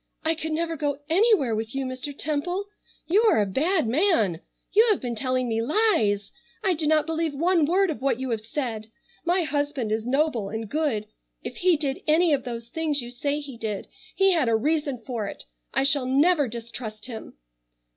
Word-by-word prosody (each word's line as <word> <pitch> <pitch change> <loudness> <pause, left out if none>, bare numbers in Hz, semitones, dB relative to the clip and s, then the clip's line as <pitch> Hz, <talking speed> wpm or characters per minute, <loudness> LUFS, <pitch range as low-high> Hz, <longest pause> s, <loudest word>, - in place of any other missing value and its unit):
"I 320 - +2
could 320 0 -4
never 330 +1 -1
go 290 -2 -1
anywhere 345 - +4
with 220 +3 -4
you 270 -1 -1
Mr. 255 +2 -4
Temple. 335 +6 -2 0.4
You 390 +6 +4
are - - +4
a 205 - +3
bad 315 - +1
man! 225 - +2 0.3
You 440 +4 +6
have 420 - +3
been 245 -2 -3
telling 255 +2 -1
me 225 -1 0
lies! 230 - +2 0.3
I 385 -3 +3
do 315 -2 0
not 310 -1 +3
believe 325 -2 -1
one 335 +1 +3
word 375 +2 +3
of 275 - -6
what 265 -3 +1
you 260 -1 -3
have 225 -2 -1
said. 225 -2 -4 0.4
My 350 +1 +2
husband 290 -6 -1
is 220 +1 -1
noble 265 -6 +1
and 225 0 -4
good. 285 -6 -1 0.4
If - - -6
he 355 -2 +3
did 280 -3 -2
any 320 +1 +4
of 270 -3 0
those 235 -1 -6
things 310 -1 0
you 240 -1 -5
say 285 +4 -2
he 275 -4 -9
did 210 -3 -4 0.3
he 390 0 +4
had 315 -9 +2
a 225 - +3
reason 290 +2 0
for 230 -5 -3
it. - - -7 0.3
I - - +1
shall 275 -2 +3
never 290 +2 +3
distrust 230 -2 -7
him." 230 - -8
280 Hz, 195 wpm, -25 LUFS, 235-320 Hz, 0.4 s, You